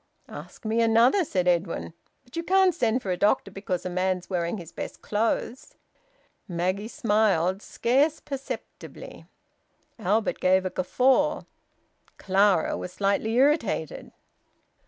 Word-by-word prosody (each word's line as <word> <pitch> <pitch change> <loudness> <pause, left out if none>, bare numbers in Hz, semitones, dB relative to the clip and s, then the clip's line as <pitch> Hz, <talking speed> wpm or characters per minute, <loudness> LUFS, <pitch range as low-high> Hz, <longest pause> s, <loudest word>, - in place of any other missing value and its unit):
"Ask - - -11
me 225 +2 +1
another!" 230 - +4
said 185 - -1
Edwin. 170 -1 0 0.3
"But 245 - -16
you 335 - -1
can't 380 +1 +3
send 245 -5 0
for 190 - -2
a 180 - -1
doctor 205 0 +1
because 190 -2 -4
a - - -2
man's 185 0 -1
wearing 175 +2 -1
his 170 -3 -10
best - - -8
clothes." 225 +3 -2 0.7
Maggie 185 +4 -2
smiled, 205 -5 +1
scarce 280 +9 +1
perceptibly. 275 -1 -8 0.7
Albert 215 +2 0
gave 185 +1 +3
a 185 - -2
guffaw. 260 +10 +1 0.7
Clara 195 -3 +2
was 180 - -6
slightly 200 +3 0
irritated. 300 - +1
210 Hz, 125 wpm, -26 LUFS, 185-250 Hz, 0.7 s, another